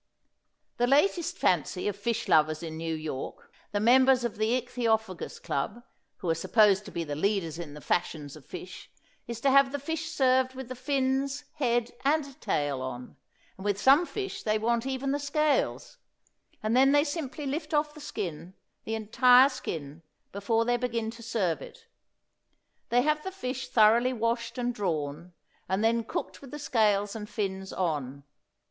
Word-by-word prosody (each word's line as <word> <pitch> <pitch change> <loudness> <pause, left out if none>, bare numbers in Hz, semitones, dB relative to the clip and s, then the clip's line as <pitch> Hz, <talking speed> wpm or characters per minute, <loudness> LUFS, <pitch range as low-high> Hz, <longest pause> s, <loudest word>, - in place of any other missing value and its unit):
The 245 - +2
latest 325 +5 +2
fancy 180 +2 +1
of 205 - -1
fish 230 +3 -2
lovers 155 +1 +3
in 160 -1 -5
New 165 0 -3
York, 155 -4 -6 0.2
the 205 - 0
members 255 +3 +5
of 235 -4 -3
the 225 +4 +2
Ichthyophagous 225 -6 -2
Club, 205 +12 -3 0.3
who 180 - -4
are - - +4
supposed 205 +4 +3
to 200 - -9
be 170 - -3
the 145 -2 -4
leaders 170 -2 -1
in 150 -4 -7
the 150 - -10
fashions 155 -5 -2
of 155 - -13
fish, 180 +4 -9 0.4
is 235 -1 -5
to 275 - +3
have 275 0 +5
the 285 - -2
fish 320 +3 -4
served 260 -3 +2
with 260 -2 -7
the 255 - -5
fins, 270 +2 -1
head 240 -4 +1
and 280 0 0
tail 145 - -1
on; 125 -1 -6 0.4
and - - -8
with 205 -1 0
some 280 +9 +5
fish 395 -2 -5
they 215 0 +1
want 235 +3 0
even 270 0 -2
the 285 - 0
scales; 300 - 0 0.7
and 215 +2 +1
then 270 +2 +5
they 290 0 +5
simply 295 -1 -4
lift 305 +3 -3
off 300 -1 +1
the 305 - -12
skin, 185 - -5 0.3
the 225 - -2
entire 250 +4 +6
skin, 160 - -6 0.3
before 225 +3 0
they 245 0 +2
begin 230 -2 -2
to 230 0 -12
serve 215 -8 -1
it. - - -12 1.0
They 245 +1 +3
have 305 +1 +1
the 380 - -4
fish 260 -8 -5
thoroughly 235 +3 +5
washed 235 +1 -2
and 245 0 -1
drawn, 170 -4 -3 0.4
and 190 +3 0
then 230 +1 +2
cooked 185 -4 -5
with 275 - -11
the 295 - -7
scales 210 -7 +1
and 210 -1 -6
fins 190 -2 -3
on. 140 -6 -2
230 Hz, 175 wpm, -28 LUFS, 185-265 Hz, 1.0 s, entire